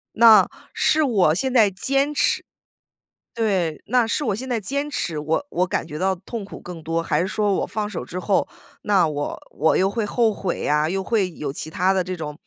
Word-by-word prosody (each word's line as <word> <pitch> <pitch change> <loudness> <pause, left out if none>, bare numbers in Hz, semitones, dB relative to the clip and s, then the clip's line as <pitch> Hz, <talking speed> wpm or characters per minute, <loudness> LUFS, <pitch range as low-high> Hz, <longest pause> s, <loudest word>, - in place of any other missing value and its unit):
那 225 -1 +7 0.3
是 310 0 +2
我 200 - +3
现 260 +7 -1
在 225 -5 +5
坚 275 +9 0
持 - - +1 0.9
对 190 -9 0
那 245 +1 +3
是 225 +6 -1
我 200 - 0
现 255 +5 -6
在 245 -3 -1
坚 280 +7 -2
持， 180 - -3
我 155 - -1
我 180 -7 +1
感 175 - -2
觉 150 - -7
到 190 +3 +1
痛 200 +3 -7
苦 - - -10
更 175 -3 -9
多， 165 +1 -1
还 - - 0
是 180 - 0
说 205 +1 0
我 - - 0
放 210 -1 -3
手 210 - -5
之 180 - -5
后， 195 +1 +1 0.4
那 195 -5 +3
我 145 -1 -4
我 160 +2 +1
又 190 +1 +3
会 220 +1 -2
后 225 +1 +2
悔 195 -3 -3
呀， 150 +1 +2
又 190 +3 -2
会 195 -4 0
有 150 -4 -5
其 155 +2 -7
他 185 +3 +2
的 190 -1 +1
这 185 +1 -4
种 150 -3 -6
195 Hz, 230 characters per minute, -22 LUFS, 165-225 Hz, 0.9 s, 那